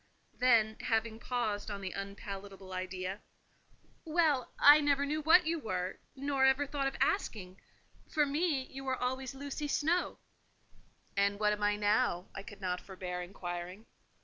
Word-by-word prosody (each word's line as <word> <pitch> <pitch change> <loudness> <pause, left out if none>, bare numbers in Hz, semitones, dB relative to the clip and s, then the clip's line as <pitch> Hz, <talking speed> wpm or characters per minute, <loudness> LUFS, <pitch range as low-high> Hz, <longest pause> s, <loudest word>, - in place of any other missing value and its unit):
Then, 225 -4 +3
having 225 -1 -1
paused 220 -5 -2
on 200 -1 -4
the 190 -2 -4
unpalatable 195 -1 -7
idea, 185 +1 -4 0.8
"Well, 310 -5 +2
I 295 +1 +8
never 285 -1 +2
knew 305 +2 -1
what 320 +3 +6
you 330 +1 0
were, 185 -7 -3 0.2
nor 275 0 0
ever 265 +2 +4
thought 280 -1 -1
of 270 - -3
asking: 190 - -1 0.5
for 300 -2 +3
me, 290 -1 0
you 270 +1 -9
were 260 -1 -1
always 260 +1 -3
Lucy 285 +2 -4
Snowe." 320 +5 +1 1.0
"And 200 0 +2
what 210 0 +3
am 210 - -5
I 205 0 +3
now?" 205 -3 +1
I - - -6
could 205 0 -12
not 180 -1 -2
forbear 180 -2 -5
inquiring. 180 +2 -6
220 Hz, 150 wpm, -33 LUFS, 195-280 Hz, 1.0 s, I